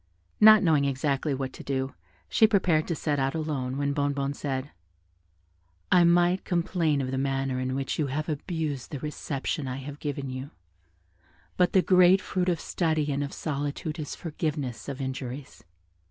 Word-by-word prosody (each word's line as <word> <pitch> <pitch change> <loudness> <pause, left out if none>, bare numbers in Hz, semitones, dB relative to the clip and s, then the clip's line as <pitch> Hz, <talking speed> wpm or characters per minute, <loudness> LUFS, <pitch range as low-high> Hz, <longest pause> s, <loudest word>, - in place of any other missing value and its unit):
Not 215 -1 +8
knowing 155 -5 +3
exactly 140 +1 0
what 130 -1 -4
to - - -10
do, 135 -1 -2 0.3
she 220 - +5
prepared 185 -7 +2
to 170 - -1
set 150 -2 -1
out 135 +3 0
alone, 140 -5 -2
when 140 0 0
Bonnebonne 140 -1 0
said, 140 -1 -4 1.2
"I 180 -1 +6
might 175 +2 +3
complain 170 -4 +1
of 130 -1 -3
the 130 - -1
manner 135 -1 -1
in 130 0 -2
which 135 +3 -2
you 150 - +1
have 150 +3 -3
abused 155 -3 -3
the 145 - -5
reception 150 0 -3
I 130 0 -3
have 140 +2 -8
given 140 -2 -4
you: 130 +2 -6 1.1
but 180 -1 +2
the 190 - +5
great 185 0 +6
fruit 185 -2 -1
of 170 -3 0
study 155 -4 0
and 140 +1 -1
of 140 - -5
solitude 145 +2 -3
is 150 - -4
forgiveness 150 -7 -4
of 140 0 -5
injuries. 130 +1 -6
145 Hz, 170 wpm, -27 LUFS, 135-165 Hz, 1.2 s, Not